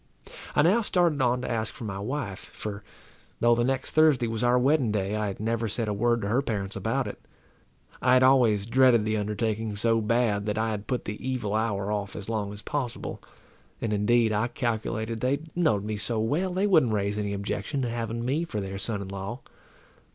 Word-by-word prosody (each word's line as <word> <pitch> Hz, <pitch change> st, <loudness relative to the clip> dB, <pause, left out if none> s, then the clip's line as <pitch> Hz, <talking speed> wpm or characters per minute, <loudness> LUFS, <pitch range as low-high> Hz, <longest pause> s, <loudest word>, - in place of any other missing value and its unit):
I 150 Hz, -, +5 dB
now 195 Hz, +9 st, +4 dB
started 175 Hz, -8 st, +1 dB
on 125 Hz, 0 st, +2 dB
to 125 Hz, -, -3 dB
ask 110 Hz, -2 st, -1 dB
for -, -, -8 dB
my 100 Hz, -3 st, -4 dB
wife; 105 Hz, -3 st, -4 dB
for, 105 Hz, -1 st, -6 dB, 0.6 s
though 120 Hz, 0 st, +5 dB
the 120 Hz, 0 st, +2 dB
next 130 Hz, +1 st, -1 dB
Thursday 155 Hz, -6 st, +4 dB
was 115 Hz, +1 st, -2 dB
our 120 Hz, +1 st, +4 dB
wedding 130 Hz, -2 st, +3 dB
day, 100 Hz, 0 st, -1 dB
I 110 Hz, -1 st, -1 dB
had 100 Hz, -, -5 dB
never 115 Hz, +1 st, -1 dB
said 110 Hz, +2 st, -2 dB
a 105 Hz, -, 0 dB
word 120 Hz, +3 st, +1 dB
to -, -, -1 dB
her 120 Hz, +5 st, +2 dB
parents 100 Hz, -6 st, -3 dB
about -, -, -1 dB
it. -, -, -7 dB, 0.8 s
I -, -, +4 dB
had 130 Hz, 0 st, +6 dB
always 120 Hz, -6 st, +4 dB
dreaded 120 Hz, -2 st, +4 dB
the 110 Hz, 0 st, 0 dB
undertaking 105 Hz, +1 st, -2 dB
so 115 Hz, +2 st, +2 dB
bad, 110 Hz, -2 st, +1 dB
that 105 Hz, 0 st, -1 dB
I 110 Hz, 0 st, 0 dB
had 105 Hz, -1 st, -5 dB
put 125 Hz, -, -2 dB
the 105 Hz, -, -6 dB
evil 125 Hz, -6 st, -2 dB
hour 105 Hz, -2 st, 0 dB
off 105 Hz, -1 st, -3 dB
as 105 Hz, +1 st, -5 dB
long 105 Hz, -3 st, -2 dB
as 105 Hz, 0 st, -9 dB
possible; 130 Hz, -5 st, -4 dB, 0.6 s
and, 110 Hz, -2 st, -1 dB
indeed, 110 Hz, +2 st, +3 dB
I 105 Hz, +3 st, +1 dB
calculated 115 Hz, -2 st, -2 dB
they 135 Hz, +4 st, 0 dB
knowed 155 Hz, -, +2 dB
me 105 Hz, 0 st, -2 dB
so 110 Hz, +2 st, -1 dB
well, 150 Hz, +12 st, 0 dB
they 190 Hz, +3 st, +1 dB
wouldn't 155 Hz, -, +4 dB
raise 100 Hz, 0 st, 0 dB
any 100 Hz, -1 st, -2 dB
objection 100 Hz, +6 st, -2 dB
to 120 Hz, -, -1 dB
having 115 Hz, 0 st, -3 dB
me 145 Hz, +6 st, 0 dB
for 110 Hz, -11 st, -4 dB
their 95 Hz, 0 st, -5 dB
son 100 Hz, -2 st, -2 dB
in -, -, -8 dB
law. 100 Hz, +6 st, -6 dB
115 Hz, 210 wpm, -27 LUFS, 105-125 Hz, 0.8 s, had